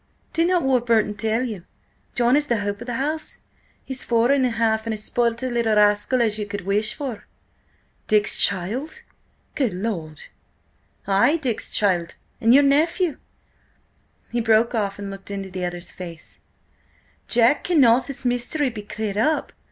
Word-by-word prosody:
"Did 330 +1 +2
not 360 -3 +2
Warburton 235 -5 +2
tell 220 +3 0
you? 215 -8 -5 0.5
John 245 +1 +3
is 295 0 +1
the 235 -3 0
hope 205 +1 -3
of 240 - -8
the 245 - -3
house. 305 +5 -3 0.4
He's 265 -1 -4
four 235 +2 +2
and 280 -1 +3
a - - -1
half, 225 -1 0
and 220 - -1
as 210 - -8
spoilt 235 +1 -1
a - - 0
little 230 -2 +1
rascal 210 +4 +3
as 220 -1 -1
you 210 - -3
could 205 0 -5
wish 210 +2 0
for." 255 -7 -6 0.8
"Dick's 210 -1 +3
child? 240 - 0 0.5
Good 245 -10 -1
Lord!" 175 -7 -4 0.8
"Ay, 200 +11 +3
Dick's 255 -8 -3
child 180 -5 0 0.3
and 230 - +4
your 280 +3 +7
nephew." 310 +4 +2 1.1
He 235 0 0
broke 225 +1 +3
off 205 -4 -1
and 200 -1 -6
looked 195 0 -10
into 195 -1 -5
the 180 -1 -3
other's 175 0 -6
face. 170 -3 -10 0.9
"Jack, 240 +4 +3
cannot 260 -8 +4
this 275 -2 -6
mystery 245 +3 0
be 220 -2 -7
cleared 210 -1 -5
up? 310 +7 0
230 Hz, 165 wpm, -23 LUFS, 205-260 Hz, 1.1 s, your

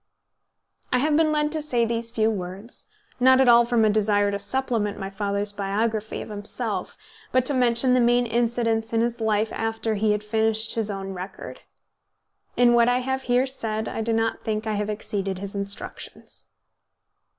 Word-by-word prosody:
I 250 - +3
have 295 +4 +2
been 315 0 +3
led 300 0 +1
to 310 0 -1
say 245 -6 +1
these 230 0 -2
few 225 -1 +1
words, 195 +3 -5 0.3
not 260 +1 +6
at 265 - +4
all 235 0 +7
from 235 -2 +2
a - - +4
desire 205 -1 +2
to 200 - -2
supplement 215 -1 -1
my 195 -1 -5
father's 200 +1 -2
biography 210 +2 -2
of - - -12
himself, 205 0 -4 0.3
but 255 -1 +2
to 285 - +2
mention 250 0 +3
the 255 - +4
main 240 0 +3
incidents 230 -1 0
in 225 - +3
his 235 0 -1
life 220 0 +1
after 225 0 -2
he 215 0 +1
had 210 0 -3
finished 220 0 0
his 220 -2 -1
own 195 -1 -5
record. 185 +1 -8 1.0
In 245 -1 +5
what 235 0 +5
I 245 - +3
have 265 +1 -2
here 250 +2 +4
said 220 -5 -3
I - - -3
do 230 +1 -1
not 225 0 0
think 215 0 -2
I 220 - -1
have 210 0 -2
exceeded 200 -2 -3
his 200 +1 -5
instructions. 200 0 -6
225 Hz, 185 wpm, -24 LUFS, 205-240 Hz, 1.0 s, all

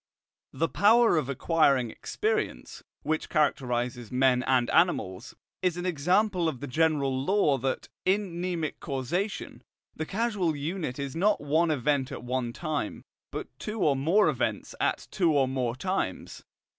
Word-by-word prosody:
The 165 - 0
power 225 +4 +5
of 150 -4 0
acquiring 140 -4 +2
experience, 435 +2 -3 0.2
which 155 0 -1
characterizes 125 -6 0
men 125 -1 +3
and 130 -2 +2
animals, 105 - +1 0.3
is 180 -2 0
an 175 - -4
example 180 +2 +2
of 130 - -6
the 145 - -5
general 145 -1 +1
law 150 -6 +2
that, 130 +1 -2 0.2
in 185 -3 0
mnemic 170 -4 -2
causation, 165 - -3 0.3
the 155 - -4
causal 200 -7 0
unit 150 -2 -3
is 140 -2 -4
not 205 +5 +2
one 160 +4 +1
event 140 -1 0
at 130 - -6
one 125 -1 -2
time, 150 -3 -4 0.3
but - - -5
two 215 -1 -4
or 145 -3 +3
more 165 +10 +3
events - - -1
at - - 0
two 170 -5 +2
or 140 -2 +3
more 125 -2 -1
times. 190 +7 -3
155 Hz, 145 wpm, -28 LUFS, 130-180 Hz, 0.3 s, power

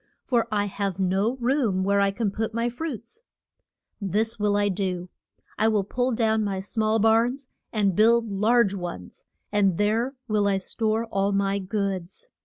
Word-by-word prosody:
for 240 -3 +1
I 205 -1 +1
have 200 -2 -3
no 195 +5 +1
room 240 -7 +1
where 200 +1 +2
I 200 - +3
can 205 +1 -1
put 220 +2 -3
my 230 +1 0
fruits. 245 - -6 0.8
This 215 +4 -1
will 205 -1 +2
I 205 0 +2
do: 185 -2 -2 0.5
I 220 - +4
will 215 -3 +2
pull 245 +6 -1
down 220 -2 +1
my 195 -2 -2
small 215 +2 0
barns 230 +5 +2 0.2
and 200 -4 +1
build 230 +2 +4
large 210 +1 +2
ones, 175 - -7 0.3
and 200 -4 +2
there 225 +6 +1
will 210 -2 +1
I 195 -1 +2
store 220 +3 -1
all 200 -2 0
my 200 0 +1
goods. 195 - -4
210 Hz, 165 wpm, -25 LUFS, 195-230 Hz, 0.8 s, I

